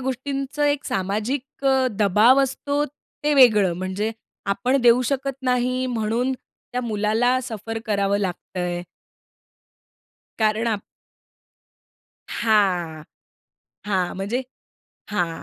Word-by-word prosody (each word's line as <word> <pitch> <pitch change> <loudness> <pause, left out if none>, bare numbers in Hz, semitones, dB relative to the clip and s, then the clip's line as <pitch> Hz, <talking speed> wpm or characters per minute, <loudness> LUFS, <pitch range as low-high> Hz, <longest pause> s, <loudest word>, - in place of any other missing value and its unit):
गोष्टींचं 270 +2 -3
एक 285 -1 +1
सामाजिक 220 +9 -3
अ, 265 -1 +4
दबाव 215 +7 +5
असतो 285 +2 -1
ते 295 +1 -5
वेगळं. 210 -9 +6
म्हणजे 190 +4 -2 0.4
आपण 200 +7 +1
देऊ 240 +1 +5
शकत 275 0 -1
नाही 255 0 +1
म्हणून 235 +2 0
त्या 250 0 -7
मुलाला 225 +3 +1
सफर 225 -1 -5
करावं 200 -1 +1
लागतंय. 180 -2 -3 1.6
कारण 220 +1 +2
आप 210 -3 -1 1.5
हां. 185 -8 +1 0.8
हां, 185 -3 0
म्हणजे 205 +7 -2 0.7
हां 175 -5 +1
225 Hz, 95 wpm, -23 LUFS, 200-260 Hz, 1.6 s, वेगळं